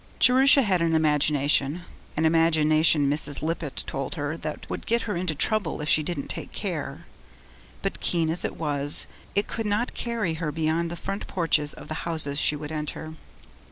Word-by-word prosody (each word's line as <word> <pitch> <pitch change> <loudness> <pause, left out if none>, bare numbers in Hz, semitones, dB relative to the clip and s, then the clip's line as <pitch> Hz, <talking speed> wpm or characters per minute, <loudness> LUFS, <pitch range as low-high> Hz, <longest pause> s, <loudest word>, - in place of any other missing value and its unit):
Jerusha 265 +2 +6
had 185 -5 +1
an 165 -1 +2
imagination 150 0 +2 0.4
an 160 - +2
imagination, 160 -2 +4
Mrs. 145 0 0
Lippett 160 -3 -3
told 135 +4 -4
her, 145 0 -3
that 155 -2 -6
would - - -6
get 235 +1 +1
her 210 -4 -3
into 170 -2 -1
trouble 200 +2 +1
if 150 - -4
she 155 - +4
didn't 150 -2 -3
take - - -5
care - - -5 0.8
but - - -2
keen 165 -2 +1
as 165 - +3
it - - -3
was, 145 -2 +3 0.3
it 205 - +2
could 225 -2 -4
not 210 +4 0
carry 230 -8 -2
her 155 -2 -1
beyond 160 +2 0
the 170 - -5
front 195 +4 -5
porch 165 -4 +2
of 150 0 -6
the - - -4 0.2
houses 150 -3 0
she 150 - +3
would 150 +1 -6
enter. 155 +1 -5
160 Hz, 180 wpm, -25 LUFS, 150-175 Hz, 0.8 s, Jerusha